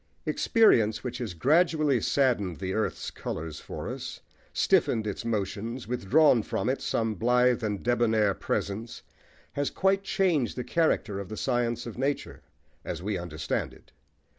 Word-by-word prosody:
Experience, 115 - +3
which 125 -1 -4
has 110 -8 -4
gradually 150 - +3
saddened 110 - +1
the 95 -1 -3
earth's 110 +1 -2
colours 80 -1 -5
for - - -7
us, - - -6 0.3
stiffened 110 -2 +2
its 105 -2 -4
motions, 110 +2 -3
withdrawn 125 +3 +4
from 105 +2 -2
it 135 - -1
some 110 -1 0
blithe 125 +4 +2
and 105 -3 -2
debonair 110 -4 +2
presence, 105 +4 -3 0.5
has 145 0 -1
quite 195 +1 +2
changed 185 - +1
the 125 - -2
character 115 -12 0
of 100 -2 -7
the 110 - -6
science 120 -2 0
of 120 0 -7
nature, 140 +2 -2 0.4
as - - -5
we 105 +2 -1
understand 80 -4 -3
it. - - -21
115 Hz, 145 wpm, -28 LUFS, 105-135 Hz, 0.5 s, withdrawn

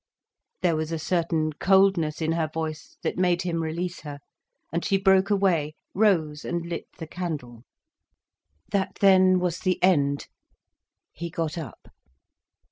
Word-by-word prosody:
There 170 -2 +3
was 155 +1 -2
a 165 - -1
certain 160 -1 0
coldness 185 -3 +3
in 160 - +1
her 165 -1 0
voice 155 -1 -5
that - - -2
made 180 -1 +2
him 170 -2 -1
release 170 +3 -3
her, 145 -2 -8 0.6
and 170 - -1
she 195 - +2
broke 190 0 +4
away, 175 -7 +1 0.2
rose 165 -8 +2
and 170 0 -3
lit 170 -1 -5
the 165 - -6
candle. 150 -9 -6 1.1
That 195 -1 0
then 185 -2 +5
was 180 -2 -1
the 185 -1 0
end. 145 -6 +2 0.8
He 170 +1 -6
got 165 -2 -3
up. 165 -5 -9
170 Hz, 140 wpm, -25 LUFS, 155-185 Hz, 1.1 s, then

